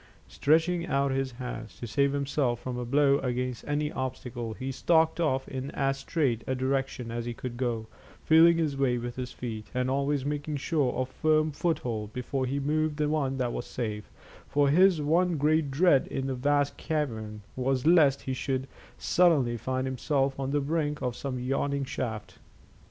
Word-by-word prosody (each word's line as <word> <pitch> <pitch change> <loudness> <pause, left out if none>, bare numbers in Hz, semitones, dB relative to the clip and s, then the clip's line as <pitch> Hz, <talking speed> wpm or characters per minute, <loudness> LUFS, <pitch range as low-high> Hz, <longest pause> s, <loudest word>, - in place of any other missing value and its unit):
Stretching 165 +3 +2
out 140 -2 +1
his 135 -1 -1
hands 120 -6 -7
to - - -5
save 140 +4 +1
himself 140 -3 0
from 130 -1 -5
a 125 0 -3
blow 140 +2 +3
against 125 -1 -2
any 150 +1 0
obstacle, 125 -4 -4
he 130 +4 -4
stalked 160 +4 +2
off 135 -5 0
in 135 0 -5
as 135 -1 0
straight 135 -5 0
a 130 - 0
direction 130 -2 -2
as 115 0 -3
he 120 -1 -4
could 120 +1 -6
go, 120 -3 -2 0.4
feeling 165 +1 +6
his 155 -4 0
way 135 -3 +1
with 120 0 -5
his 125 -1 -5
feet, 110 -3 -6
and 125 0 0
always 140 0 0
making 145 +1 -2
sure 140 -3 0
of 130 0 -1
firm 155 +3 +1
foothold 125 -10 -2
before 130 +1 -2
he 140 +2 -1
moved 150 +1 0
the 150 -1 +1
one 140 -3 0
that 125 -2 -1
was - - -4
safe, 105 -4 -4 0.4
for 145 -1 +2
his 180 +3 +5
one 165 +3 +2
great 150 +1 +2
dread 145 0 +4
in 135 - -3
the 135 - -1
vast 145 +2 +1
cavern 110 -9 -3
was 130 +1 0
lest 155 -5 +5
he 130 - -2
should 130 0 -2 0.3
suddenly 155 -10 +3
find 130 +2 -2
himself 135 +1 0
on 135 -1 -2
the 145 +1 +1
brink 150 0 -1
of 125 -2 -1
some 135 -1 -4
yawning 140 +2 -1
shaft. 110 -5 -5
135 Hz, 180 wpm, -28 LUFS, 125-150 Hz, 0.4 s, feeling